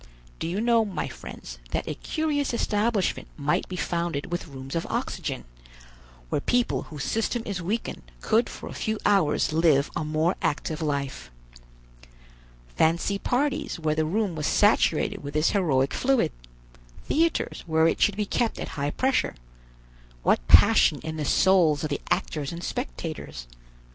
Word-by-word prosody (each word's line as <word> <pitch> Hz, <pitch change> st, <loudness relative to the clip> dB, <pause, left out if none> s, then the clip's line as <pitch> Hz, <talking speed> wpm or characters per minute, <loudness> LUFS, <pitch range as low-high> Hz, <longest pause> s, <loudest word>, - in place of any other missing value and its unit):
Do -, -, -2 dB
you 185 Hz, +5 st, -1 dB
know, 230 Hz, -1 st, +4 dB
my 195 Hz, -6 st, -3 dB
friends, -, -, -9 dB
that -, -, -2 dB
a -, -, -2 dB
curious 290 Hz, -5 st, -1 dB
establishment 210 Hz, -2 st, 0 dB
might 150 Hz, 0 st, 0 dB
be 185 Hz, -, -4 dB
founded 170 Hz, -4 st, -2 dB
with 175 Hz, -, -3 dB
rooms 135 Hz, -1 st, -8 dB
of 165 Hz, -, -1 dB
oxygen, -, -, -3 dB, 0.9 s
where -, -, 0 dB
people 245 Hz, +6 st, +1 dB
whose 150 Hz, -4 st, -6 dB
system 225 Hz, +1 st, -1 dB
is 195 Hz, -3 st, -3 dB
weakened 210 Hz, +7 st, -3 dB, 0.2 s
could 225 Hz, -, +2 dB
for -, -, -8 dB
a -, -, -7 dB
few 220 Hz, 0 st, -2 dB
hours 190 Hz, -7 st, +3 dB
live 155 Hz, -3 st, +3 dB
a -, -, -1 dB
more 155 Hz, +3 st, 0 dB
active 155 Hz, +2 st, -1 dB
life. 140 Hz, -, -3 dB, 1.5 s
Fancy 170 Hz, +5 st, +2 dB
parties 280 Hz, -, -1 dB
where 155 Hz, -1 st, +1 dB
the 155 Hz, +1 st, +1 dB
room 195 Hz, +4 st, 0 dB
was 150 Hz, -1 st, -2 dB
saturated -, -, +2 dB
with 145 Hz, +1 st, -7 dB
this 155 Hz, +1 st, +3 dB
heroic 140 Hz, -9 st, +2 dB
fluid, 270 Hz, 0 st, +2 dB, 0.7 s
theaters 330 Hz, +2 st, 0 dB
where 160 Hz, 0 st, +4 dB
it -, -, 0 dB
should 205 Hz, -1 st, +3 dB
be 210 Hz, -, 0 dB
kept 230 Hz, +3 st, 0 dB
at -, -, -4 dB
high 145 Hz, -1 st, -2 dB
pressure; 260 Hz, -, 0 dB, 0.9 s
what -, -, +2 dB
passion -, -, +6 dB
in 160 Hz, 0 st, -4 dB
the 150 Hz, -, -2 dB
souls 165 Hz, -2 st, +4 dB
of 155 Hz, -, -2 dB
the 145 Hz, -, -2 dB
actors 145 Hz, -3 st, -1 dB
and 170 Hz, +1 st, -7 dB
spectators! 70 Hz, -, -5 dB
170 Hz, 155 wpm, -26 LUFS, 150-215 Hz, 1.5 s, passion